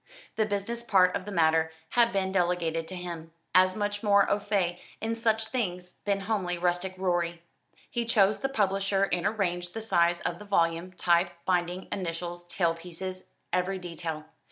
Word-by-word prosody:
The 220 -1 +1
business 205 +3 -2
part 190 -6 +4
of 185 - -3
the 205 - -6
matter 160 -2 +3 0.2
had 235 -1 +4
been 190 -2 0
delegated 175 -3 0
to 185 - -6
him, 170 -2 -6 0.2
as 185 0 +5
much 205 -1 -1
more 200 -2 +5
au 205 - +3
fait 190 -4 0 0.2
in 225 +1 -1
such 225 -1 +1
things 180 -7 -3
than 200 -1 +1
homely 195 -4 -1
rustic 175 +2 0
Rorie. 175 -2 -1 0.4
He 235 -1 -2
chose 210 -2 +3
the 270 - -1
publisher 195 -4 +1
and 175 +2 +1
arranged 175 -4 -1
the - - -2
size 175 -5 +2
of - - -3
the 210 - -10
volume, 170 -2 +1
type, 175 0 +3 0.2
binding, 180 0 0
initials, 175 -1 -4
tail 170 -2 +1
pieces, 180 +2 -7 0.3
every 180 +1 +1
detail. 165 -3 -5
185 Hz, 170 wpm, -28 LUFS, 175-205 Hz, 0.4 s, as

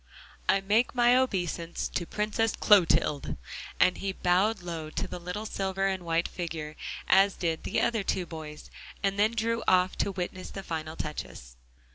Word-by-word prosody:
I 195 - +4
make 215 +6 +2
my 240 0 +5
obeisance 175 -9 0
to 175 - -3
Princess 215 +1 0
Clotilde!" 170 -7 +4 0.4
and 185 - +4
he 195 - -2
bowed 190 +3 +2
low 165 -3 -5
to - - -3
the - - -6
little 180 +5 -5
silver 195 -2 -1
and 190 -1 0
white 165 0 0
figure, 160 -3 -5 0.3
as 195 +1 +5
did 165 -2 -1
the - - 0
other 225 -3 +1
two 190 -2 -1
boys, 155 -3 -9 0.3
and 195 0 0
then 215 +2 +3
drew 230 +1 0
off 185 0 +4
to 200 - +1
witness 185 0 -5
the 195 - -7
final 160 -2 -4
touches. 65 - -6
185 Hz, 165 wpm, -29 LUFS, 165-205 Hz, 0.4 s, my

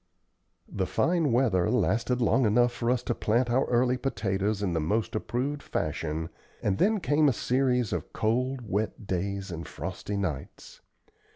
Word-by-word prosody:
The 95 -2 -2
fine 165 -5 +1
weather 110 -7 +2
lasted 125 +1 +1
long 120 +1 +3
enough 120 +3 +4
for 120 0 -2
us 125 0 +1
to - - -1
plant 120 +2 +1
our 130 +3 +3
early 125 +1 +2
potatoes 105 -5 -1
in 90 -4 0
the 80 - +1
most 105 +9 0
approved 130 +6 -2
fashion, 80 - -3 0.3
and 95 -2 0
then 215 +2 +3
came 150 -3 +3
a - - +1
series 125 -1 +1
of - - -4
cold, 125 +4 0
wet 105 +2 -2
days 95 +1 -2
and 85 0 -6
frosty 95 +5 -5
nights. 80 -9 -5
115 Hz, 160 wpm, -28 LUFS, 95-125 Hz, 0.3 s, enough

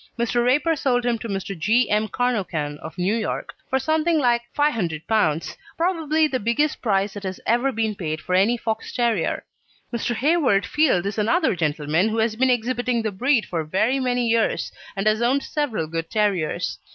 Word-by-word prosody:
Mr. 240 0 +1
Raper 295 +7 +2
sold 245 -4 0
him 235 -2 +1
to 230 - -6
Mr. 195 0 -3
G. 220 +9 +2
M. 210 +1 +1
Carnochan, 185 -11 -2
of 160 - -9
New 185 +3 +1
York, 225 -2 -3 0.2
for 265 - +2
something 315 +4 +1
like 240 -4 +2 0.2
P500, 200 - 0 0.7
probably 320 -3 +1
the 260 -3 -2
biggest 235 +7 0
price 200 -3 +1
that 205 - -7
has 190 -1 -5
ever 240 +4 +2
been 220 -2 -1
paid 155 -5 -4
for 180 - -4
any 200 +6 +3
Fox 225 -1 -3
terrier. 235 -7 0 0.5
Mr. 235 0 -1
Hayward 275 -6 +2
Field 275 - +2
is 200 +2 -2
another 310 - +2
gentleman 160 +4 0
who 220 - -2
has 220 0 +1
been 260 +3 +2
exhibiting 245 0 0
the 215 - -1
breed 245 +3 +1
for 165 -3 -3
very 215 - +1
many 245 -2 0
years, 230 -1 +1 0.2
and 195 +1 -2
has 215 +1 +2
owned 260 +4 +2
several 280 - -2
good 165 +1 -4
terriers. 180 -5 -1
225 Hz, 180 wpm, -23 LUFS, 195-255 Hz, 0.7 s, any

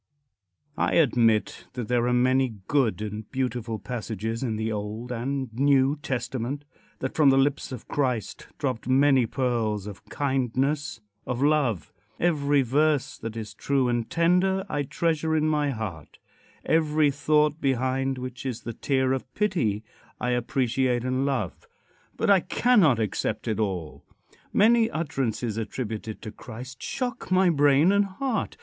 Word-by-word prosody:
IX. 130 -10 -53
CONCLUSION. - - +2
I - - +8
admit 115 -4 +1
that 120 -3 -4
there 120 -1 +1
are - - +2
many 130 -1 +2
good 130 -7 +1
and 105 0 -6
beautiful 125 -4 -2
passages 115 -1 -4
in 120 -5 -1
the 110 +1 -2
Old 105 +3 -4
and 130 0 -3
New 135 +2 +3
Testament; 130 +2 -3 0.4
that 130 - -2
from 150 -3 +5
the 135 - +4
lips 140 +1 +1
of 125 -4 -8
Christ 125 -6 -2
dropped 130 -6 -3
many 135 -2 +4
pearls 115 -5 -1
of 105 -2 -9
kindness 135 -1 -1 0.3
of 125 +1 -1
love. 140 - +1 0.3
Every 145 -4 +2
verse 145 +3 +1
that 115 0 -6
is 110 -2 -6
true 135 -3 0
and 120 -1 -1
tender 180 +3 +2
I 145 -5 -1
treasure 160 +2 0
in 155 0 +2
my 150 -2 +1
heart. 95 - -6 0.5
Every 155 -2 +3
thought, 150 +2 +2
behind 135 0 0
which 125 0 -6
is 130 -4 -4
the 115 - -5
tear 130 +1 +1
of 130 -1 -4
pity, 150 - 0 0.4
I 125 - -1
appreciate 125 0 0
and 130 +2 0
love. 120 -10 -3 0.5
But - - +2
I 195 - +7
cannot 180 - +3
accept 110 +1 -2
it 110 -2 -1
all. 95 -7 -3 0.5
Many 225 +2 +4
utterances 130 - -2
attributed 110 -1 -5
to 110 - -6
Christ 125 +4 -10
shock 250 -6 -4
my 185 -1 +4
brain 145 +3 +4
and 200 0 +3
heart. 225 +4 -3
130 Hz, 150 wpm, -26 LUFS, 115-145 Hz, 0.5 s, I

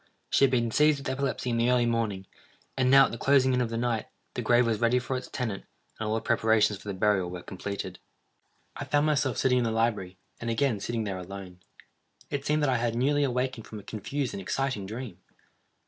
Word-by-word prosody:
She - - +4
had 135 - +6
been 120 -3 +1
seized 150 +4 +4
with 140 -1 -5
epilepsy 130 -2 -2
in 115 - 0
the 115 +1 +2
early 125 -1 +3
morning, 110 -5 -1 0.5
and 130 -1 +2
now, 135 +1 +8
at - - -4
the 115 - -6
closing 135 -2 +4
in 125 - +2
of 120 - -1
the 115 - -3
night, 115 -2 -1 0.3
the - - -3
grave 120 0 +4
was 115 -1 0
ready 120 +1 +3
for 125 +1 -2
its 130 - -4
tenant, 110 -6 -4 0.4
and 110 -1 -2
all 110 - +1
the 110 - -1
preparations 110 -3 +2
for 105 - -13
the 100 - -3
burial 95 -2 +2
were 90 0 -7
completed. 95 -1 -6 0.8
I - - -5
found 145 0 +2
myself 140 -5 +1
sitting 125 -1 +3
in - - +1
the 115 - 0
library, 110 -5 -1 0.2
and 115 - -4
again 115 -1 +1
sitting 115 +2 -2
there 95 -3 -3
alone. 90 -1 -9 0.7
It 140 0 -3
seemed 150 0 +2
that - - +3
I 130 - +2
had 115 0 -1
newly 145 +4 +2
awakened 125 -3 -1
from 110 - -8
a - - -12
confused 125 +6 -3
and 100 - -5
exciting 115 -1 -2
dream. 110 -4 -7
115 Hz, 225 wpm, -28 LUFS, 105-130 Hz, 0.8 s, now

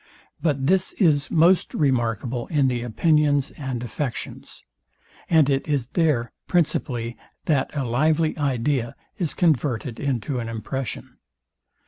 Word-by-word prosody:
But 140 -5 0
this 185 +4 +2
is 150 -7 +2
most 170 +3 +3
remarkable 120 -3 0
in 145 -5 +2
the 120 -1 -2
opinions 145 +3 +2
and 130 -4 -5
affections; 125 +1 -5 0.7
and 160 -4 +5
it 135 +1 0
is 140 -5 -1
there 145 -9 +1 0.2
principally 125 -8 0 0.3
that 145 -4 +1
a 135 - 0
lively 155 +6 +1
idea 130 -3 -1 0.2
is 165 -6 -1
converted 135 -7 0
into 130 -1 -2
an 115 -1 -4
impression. 115 +2 -5
135 Hz, 120 wpm, -23 LUFS, 120-155 Hz, 0.7 s, and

